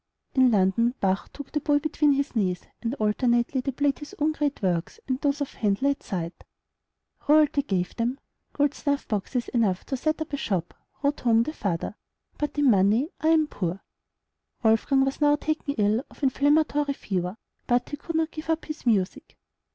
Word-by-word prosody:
In 260 -2 +5
London, 220 +4 +2
Bach 190 0 0
took 285 -1 -9
the 300 - 0
boy 290 0 +2
between 300 -1 +2
his 275 -1 -1
knees, 185 -5 0 0.2
and 235 +3 -2
alternately 240 +3 +1
they 275 - -3
played 280 +2 0
his 295 - -9
own 305 +1 +2
great 295 -2 -1
works 175 -3 -1
and 260 +1 -1
those 285 0 0
of 285 - -3
Handel 210 +6 +1
at 280 - -5
sight. 175 -4 -5 0.8
Royalty 300 -1 +5
gave 185 -9 -2
them 245 +4 -1 0.3
"gold 290 -1 +2
snuffboxes 250 -5 -2
enough 210 -7 +1
to 270 - -2
set 310 +5 -1
up 315 -2 -5
a - - 0
shop," 185 -9 -2 0.3
wrote 285 +1 +1
home 230 -1 +4
the 310 - -5
father; 195 - -2 0.5
"but 295 0 -2
in 285 -3 +5
money 210 - +3
I 310 - 0
am 320 -1 +5
poor." 185 - -4 0.8
Wolfgang 235 +5 +3
was 270 +2 -3
now 290 0 +5
taken 305 -1 -2
ill 215 +3 +2
of - - -17
inflammatory 290 +1 +2
fever; 185 -2 -3 0.3
but 245 0 +1
he 290 - -5
could 325 +3 -6
not 320 0 +1
give 315 0 -8
up 325 0 0
his 310 -4 -7
music. 200 -5 0
270 Hz, 180 wpm, -26 LUFS, 210-290 Hz, 0.8 s, In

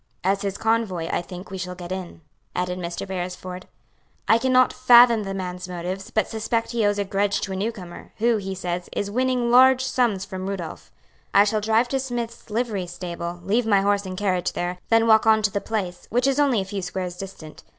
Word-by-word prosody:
"As 195 +2 +1
his 200 -1 -3
convoy, 220 -7 0
I - - 0
think 180 +2 -10
we 190 - -5
shall 180 0 -5
get 175 0 -8
in," 185 -3 -6 0.3
added 180 0 -2
Mr. 170 +2 -5
Beresford. 180 0 -5 0.6
"I 225 - +5
cannot 255 0 +4
fathom 245 -2 +6
the 195 0 -4
man's 180 -1 -5
motives, 180 +2 -5
but 220 - 0
suspect 230 +1 -2
he 235 -2 0
owes 205 0 +1
a 200 - 0
grudge 200 +1 0
to 195 - -3
a - - -3
newcomer, 190 -3 -5
who, 230 +1 +2
he 195 -2 -4
says, 180 -1 -4
is 200 0 -2
winning 250 0 +1
large 260 +1 +6
sums 235 -7 +1
from 190 -1 -5
Rudolph. 180 -5 -6 0.4
I 200 - +8
shall 215 +1 0
drive 225 +3 +2
to 270 - 0
Smith's 240 -3 -5
livery 215 -5 -2
stable, 175 0 -6
leave 220 +5 +1
my 200 -3 +4
horse 200 0 +1
and 185 0 -6
carriage 185 -3 0
there, 180 +1 -3
then 225 0 +4
walk 220 0 +5
on 220 -1 +5
to 210 - +2
the 200 - -2
place, 185 -5 -4
which 245 +3 +1
is 275 +1 +2
only 270 -8 +3
a - - -4
few 195 0 -4
squares 180 0 -4
distant. 185 -5 -9
200 Hz, 210 wpm, -24 LUFS, 180-230 Hz, 0.6 s, I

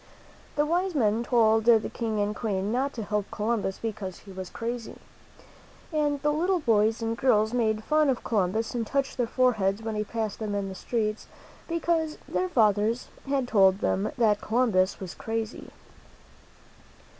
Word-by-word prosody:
The 295 - +2
wise 350 +3 0
men 225 -3 +2
told 225 -2 +3
the 230 -2 +5
King 225 -3 -2
and 205 +1 0
Queen 200 -3 -2
not 265 +4 0
to 225 - -5
help 210 -1 -2
Columbus, 215 -3 -1
because 205 -5 -5
he 200 - -13
was 185 -1 -7
crazy. 235 0 -5 1.0
And 295 -2 +1
the 295 0 +2
little 355 +4 +1
boys 225 -4 +2
and 225 0 -1
girls 220 -3 +2
made 220 -3 +1
fun 305 +1 +3
of 255 - -1
Columbus 215 +1 0
and 235 -3 -2
touched 275 -1 -1
their 245 -2 +1
foreheads 225 -5 +1
when 220 0 -3
he 210 0 -1
passed 220 -1 -4
them 210 -2 -3
in 200 -1 -2
the - - -6
streets, 215 +1 -2 0.4
because 330 -2 0
their 370 - -1
fathers 220 - +2 0.2
had 270 -2 0
told 195 -4 +5
them 200 +1 0
that 215 -4 +3
Colum 240 +2 +1
bus 185 0 +2
was 185 -3 -6
crazy. 225 0 -4
225 Hz, 170 wpm, -27 LUFS, 210-255 Hz, 1.0 s, the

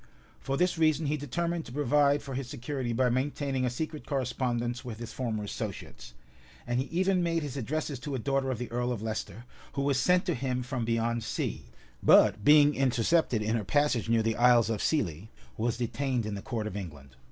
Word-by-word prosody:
For 135 0 -2
this 180 0 +1
reason 155 -1 +3
he 145 +1 +1
determined 170 +4 -2
to - - -10
provide 145 +1 +2
for 135 - -7
his 130 -1 -3
security 130 -2 -4
by 125 +2 +2
maintaining 135 0 -1
a - - +1
secret 155 +4 -5
correspondence 120 -2 -1
with 120 -4 -6
his 120 0 -7
former 115 -5 -2
associates; 60 -10 -7 0.5
and 120 +1 0
he 130 - 0
even 185 +2 +1
made 165 -2 0
his 140 -3 -5
addresses 140 +1 -3
to 145 +1 -4
a - - -1
daughter 135 +2 0
of 130 - -1
the 125 +1 -6
earl 120 +1 -1
of 110 -3 -4
Leicester, 110 0 -5 0.3
who 140 - -1
was 140 -2 +2
sent 180 +3 +3
to 175 - +1
him 125 -1 -2
from 125 -2 -3
beyond 115 0 0
sea, - - -3 0.4
but 105 0 +5
being 150 +2 +7
intercepted 130 -1 +2
in 110 +2 0
her 110 - -1
passage 145 -1 +1
near 115 -1 +3
the 115 -1 0
Isles 120 -2 +5
of 110 - -2
Scilly, 105 - -1 0.3
was 115 +1 -1
detained 125 0 -1
in 105 - -3
the 100 - -5
court 115 -2 -3
of 110 - -5
England. 75 -9 -8
125 Hz, 205 wpm, -29 LUFS, 115-145 Hz, 0.5 s, being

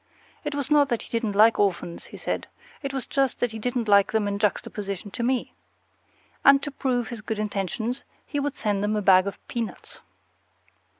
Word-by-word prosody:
It 295 -2 -3
was 285 -1 -3
not 290 -2 +5
that 235 - -1
he - - -15
didn't 230 -3 -1
like 220 +3 +6
orphans, 180 -4 0
he - - -11
said; - - -3 0.3
it 275 - -3
was 270 -2 -3
just 270 -2 0
that 245 - +1
he 220 - -6
didn't 245 0 -1
like 200 -1 +5
them 220 -2 +1
in 200 0 -2
juxtaposition 200 -1 -2
to 235 - -5
me. 250 +1 0 0.9
And 275 0 +8
to 290 - -3
prove 250 -4 -1
his 235 -3 -6
good 220 0 -3
intentions, 215 +4 -2 0.2
he 290 - -2
would 285 0 -2
send 205 -5 -1
them 210 +1 +1
a 210 - 0
bag 185 0 +6
of 200 - -4
peanuts. 230 -2 -5
225 Hz, 195 wpm, -25 LUFS, 205-260 Hz, 0.9 s, And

